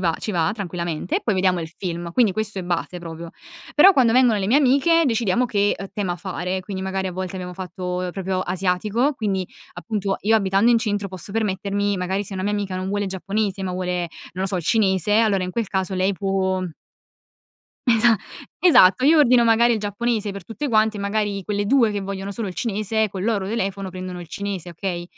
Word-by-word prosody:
va 165 Hz, -3 st, +1 dB
ci 215 Hz, -, -4 dB
va 165 Hz, -2 st, +1 dB
tranquillamente 175 Hz, -, -3 dB
e -, -, -16 dB
poi 215 Hz, -, 0 dB
vediamo 185 Hz, -1 st, +2 dB
il 160 Hz, -, -5 dB
film. 170 Hz, 0 st, -5 dB
Quindi, 215 Hz, +1 st, +3 dB
questo 215 Hz, -1 st, -3 dB
è -, -, -3 dB
base 175 Hz, 0 st, -2 dB
proprio. 165 Hz, -1 st, -8 dB, 0.5 s
Però, 380 Hz, +7 st, +8 dB
quando 245 Hz, -8 st, +4 dB
vengono 250 Hz, -3 st, +4 dB
le 190 Hz, -, -1 dB
mie 245 Hz, -, +4 dB
amiche 295 Hz, +4 st, +4 dB
decidiamo 235 Hz, 0 st, +1 dB
che, 205 Hz, -2 st, +1 dB
uhm, 195 Hz, -, -5 dB
tema 190 Hz, -4 st, -2 dB
fare, 185 Hz, 0 st, -3 dB
quindi 190 Hz, 0 st, -5 dB
magari 190 Hz, 0 st, -2 dB
a 185 Hz, -, -4 dB
volte 185 Hz, +1 st, -5 dB
abbiamo 180 Hz, -1 st, -6 dB
fatto, 185 Hz, 0 st, -7 dB
uhm, 180 Hz, 0 st, -2 dB
proprio 190 Hz, 0 st, -2 dB
asiatico, 190 Hz, +9 st, 0 dB
quindi 195 Hz, -6 st, -2 dB, 0.3 s
appunto 200 Hz, +1 st, -2 dB
io 220 Hz, +2 st, +3 dB
abitando 195 Hz, +1 st, +3 dB
in 230 Hz, -, +5 dB
centro 205 Hz, -3 st, -1 dB
posso 190 Hz, +1 st, -8 dB
permettermi 200 Hz, -1 st, -1 dB
magari 190 Hz, +2 st, -2 dB
se 195 Hz, -, -8 dB
una 185 Hz, -, -3 dB
mia 205 Hz, -, 0 dB
amica 200 Hz, -2 st, -2 dB
non 185 Hz, +1 st, -3 dB
vuole 205 Hz, +1 st, -1 dB
il -, -, -3 dB
giapponese, 195 Hz, +1 st, -2 dB
ma 190 Hz, -, -2 dB
vuole, 180 Hz, -1 st, -2 dB, 0.2 s
non 185 Hz, +2 st, -4 dB
lo -, -, 0 dB
so, 190 Hz, -, -2 dB
il 175 Hz, -, -3 dB
cinese, 195 Hz, -1 st, +2 dB
allora 205 Hz, -5 st, +2 dB
in 180 Hz, -, -4 dB
quel 230 Hz, -2 st, -2 dB
caso 190 Hz, -1 st, -2 dB
lei 185 Hz, +2 st, +1 dB
può 190 Hz, -1 st, -1 dB, 1.3 s
Esa 230 Hz, -1 st, +5 dB, 0.4 s
esatto. 225 Hz, -, +6 dB
Io 315 Hz, +3 st, +6 dB
ordino 250 Hz, -4 st, +5 dB
magari 235 Hz, +1 st, +4 dB
il 220 Hz, -, -1 dB
giapponese 210 Hz, +1 st, -1 dB
per 195 Hz, -2 st, -8 dB
tutte 280 Hz, +8 st, -4 dB
quante, 215 Hz, -2 st, +2 dB
magari 200 Hz, 0 st, -1 dB
quelle 205 Hz, +1 st, -2 dB
2 240 Hz, -1 st, +4 dB
che 205 Hz, -1 st, -2 dB
vogliono 195 Hz, 0 st, -5 dB
solo 215 Hz, +2 st, -4 dB
il 185 Hz, -, -6 dB
cinese 220 Hz, 0 st, -1 dB
col 190 Hz, -1 st, -5 dB
loro 205 Hz, -4 st, 0 dB
telefono 195 Hz, -3 st, -2 dB
prendono 185 Hz, -1 st, -6 dB
il 170 Hz, -, -10 dB
cinese, 195 Hz, -2 st, -5 dB
okay, 175 Hz, 0 st, -4 dB
195 Hz, 210 wpm, -22 LUFS, 185-220 Hz, 1.3 s, Però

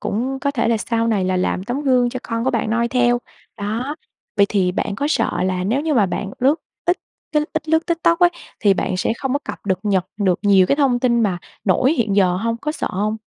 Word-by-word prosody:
cũng 260 Hz, +5 st, -2 dB
có 280 Hz, -, 0 dB
thể 230 Hz, -5 st, 0 dB
là 230 Hz, -, +3 dB
sau 230 Hz, +1 st, -1 dB
này 205 Hz, -5 st, +1 dB
là 185 Hz, 0 st, 0 dB
làm 185 Hz, 0 st, -1 dB
tấm 245 Hz, +6 st, -2 dB
gương 255 Hz, -3 st, +3 dB
cho 255 Hz, -, -5 dB
con 230 Hz, 0 st, -3 dB
của 265 Hz, -, +2 dB
bạn 230 Hz, -2 st, -1 dB
noi 235 Hz, +1 st, +1 dB
theo. 245 Hz, -1 st, +2 dB, 0.4 s
Đó, 230 Hz, +8 st, -3 dB, 0.4 s
vậy 200 Hz, -, +5 dB
thì 185 Hz, -3 st, +1 dB
bạn 200 Hz, -, -2 dB
có 280 Hz, -, -1 dB
sợ -, -, 0 dB
là 185 Hz, -1 st, -1 dB
nếu 230 Hz, +8 st, +1 dB
như 310 Hz, 0 st, 0 dB
mà 215 Hz, -6 st, +4 dB
bạn 195 Hz, +2 st, -3 dB
lướt 270 Hz, +4 st, +4 dB, 0.3 s
ít 350 Hz, +1 st, +2 dB, 0.4 s
cái 300 Hz, -1 st, +3 dB
ít 315 Hz, -1 st, -3 dB
lướt 320 Hz, +1 st, +2 dB
TikTok 335 Hz, 0 st, +2 dB
ấy 355 Hz, -1 st, +5 dB, 0.3 s
thì 200 Hz, -2 st, +4 dB
bạn 185 Hz, -, -1 dB
sẽ 195 Hz, -, 0 dB
không 265 Hz, -2 st, -2 dB
có 285 Hz, -, +1 dB
cập -, -, -7 dB
được 190 Hz, -2 st, +1 dB
nhật 195 Hz, -4 st, +1 dB
được 190 Hz, -4 st, +1 dB
nhiều 195 Hz, -3 st, +5 dB
cái 280 Hz, -, +2 dB
thông 270 Hz, -4 st, +2 dB
tin 240 Hz, -2 st, +2 dB
mà 190 Hz, -4 st, 0 dB, 0.3 s
nổi 230 Hz, -, +3 dB
hiện 220 Hz, -9 st, 0 dB
giờ 180 Hz, -3 st, +3 dB
hông? 230 Hz, +3 st, -1 dB
Có 300 Hz, +6 st, -3 dB
sợ -, -, -3 dB
hông? 210 Hz, +3 st, -1 dB
230 Hz, 250 wpm, -20 LUFS, 200-270 Hz, 0.4 s, vậy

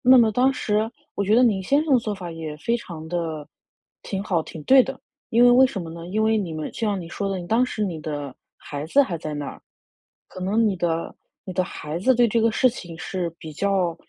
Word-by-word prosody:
那 260 Hz, -1 st, +7 dB
么 230 Hz, -3 st, +5 dB
当 250 Hz, +5 st, +4 dB
时 220 Hz, -4 st, 0 dB, 0.3 s
我 -, -, +1 dB
觉 205 Hz, +2 st, +2 dB
得 245 Hz, -, +6 dB
你 205 Hz, -6 st, +3 dB
先 280 Hz, +10 st, +2 dB
生 300 Hz, -, 0 dB
的 250 Hz, -, +5 dB
做 215 Hz, -2 st, -3 dB
法 180 Hz, -3 st, -7 dB
也 160 Hz, -2 st, -6 dB
非 230 Hz, +10 st, -1 dB
常 165 Hz, -8 st, -9 dB
的 160 Hz, -3 st, -3 dB, 0.6 s
挺 195 Hz, -1 st, -3 dB
好 185 Hz, -5 st, 0 dB
挺 155 Hz, -1 st, -9 dB
对 265 Hz, 0 st, +7 dB
的。 270 Hz, +1 st, -6 dB, 0.3 s
因 235 Hz, +2 st, +4 dB
为 245 Hz, -, +8 dB
为 255 Hz, +2 st, +7 dB
什 215 Hz, -8 st, -5 dB
么 165 Hz, -, -7 dB
呢 170 Hz, +1 st, -8 dB
因 215 Hz, +4 st, 0 dB
为 220 Hz, 0 st, +3 dB
你 185 Hz, -6 st, -3 dB
们 155 Hz, -1 st, -5 dB
像 210 Hz, -4 st, -1 dB
你 170 Hz, -, -8 dB
说 200 Hz, +3 st, -3 dB
的， 195 Hz, -1 st, -2 dB
你 175 Hz, -, -7 dB
当 240 Hz, +3 st, +3 dB
时 215 Hz, -4 st, -2 dB
你 175 Hz, -5 st, -3 dB
的 145 Hz, -3 st, -5 dB, 0.2 s
孩 145 Hz, +1 st, -6 dB
子 280 Hz, -, +5 dB
还 175 Hz, -, -3 dB
在 155 Hz, -1 st, -5 dB
那 145 Hz, 0 st, -4 dB
儿。 -, -, -8 dB, 0.7 s
可 185 Hz, -, -10 dB
能 210 Hz, +5 st, +2 dB
你 200 Hz, -3 st, 0 dB
的 165 Hz, -1 st, -2 dB, 0.3 s
你 185 Hz, -, -6 dB
的 185 Hz, +1 st, +1 dB
孩 155 Hz, -1 st, -5 dB
子 260 Hz, +8 st, +3 dB
对 240 Hz, 0 st, +4 dB
这 230 Hz, +2 st, +1 dB
个 230 Hz, +1 st, +3 dB
事 255 Hz, +3 st, +4 dB
情 175 Hz, -8 st, -9 dB
是 175 Hz, +2 st, -3 dB
比 155 Hz, -, -9 dB
较 185 Hz, 0 st, 0 dB
195 Hz, 270 characters per minute, -24 LUFS, 165-230 Hz, 0.7 s, 为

